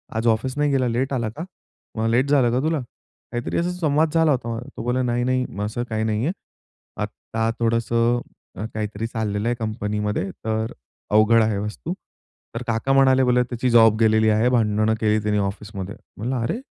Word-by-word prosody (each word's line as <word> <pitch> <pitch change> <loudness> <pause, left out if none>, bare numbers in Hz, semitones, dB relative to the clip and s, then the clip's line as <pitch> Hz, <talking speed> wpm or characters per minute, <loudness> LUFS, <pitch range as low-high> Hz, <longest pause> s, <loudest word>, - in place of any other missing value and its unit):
आज 115 +1 0
ऑफिस 115 +4 +1
नाही 150 0 +2
गेला 130 -2 +2
लेट 130 +4 -1
आला 120 -4 -1
का? 145 +9 -7 0.5
मग 110 +1 +1
लेट 130 +4 +2
झालं 130 -5 +4
का 125 - +1
तुला?" 160 -1 +1
काहीतरी 120 0 -7
असा 175 +1 0
संवाद 155 -1 +2
झाला 160 -2 +4
होता. 115 -3 -1 0.2
तो - - -4
बोलला, 125 +2 0
"नाही, 120 0 0
नाही 130 0 +1 0.2
असं 115 +3 -3
काही 110 0 -1
नाहीये. 110 +8 0 0.7
आता 115 0 -3
थोडंसं 115 +1 +2 0.5
काहीतरी 110 +1 -3
चाललेलं 110 -2 -2
आहे 120 - +1
कंपनीमध्ये 105 -2 -2
तर 110 0 -3 0.4
अवघड 110 +2 +5
आहे 110 -2 0
वस्तू." 105 - -4 0.6
तर 115 - -3
काका 115 +4 +1
म्हणाले, 130 -1 +5
"बोले 125 0 +3
त्याची 125 +1 -2
जॉब 115 -2 +6
गेलेली 110 -1 +4
आहे. 110 +3 +3
भांडणं 110 -2 +2
केली 110 -1 +2
त्यानी 105 -1 +1
ऑफिसमध्ये" 100 0 -4 0.2
म्हणला, 120 +3 -2
"अरे, 115 - -1
115 Hz, 170 wpm, -23 LUFS, 110-125 Hz, 0.7 s, जॉब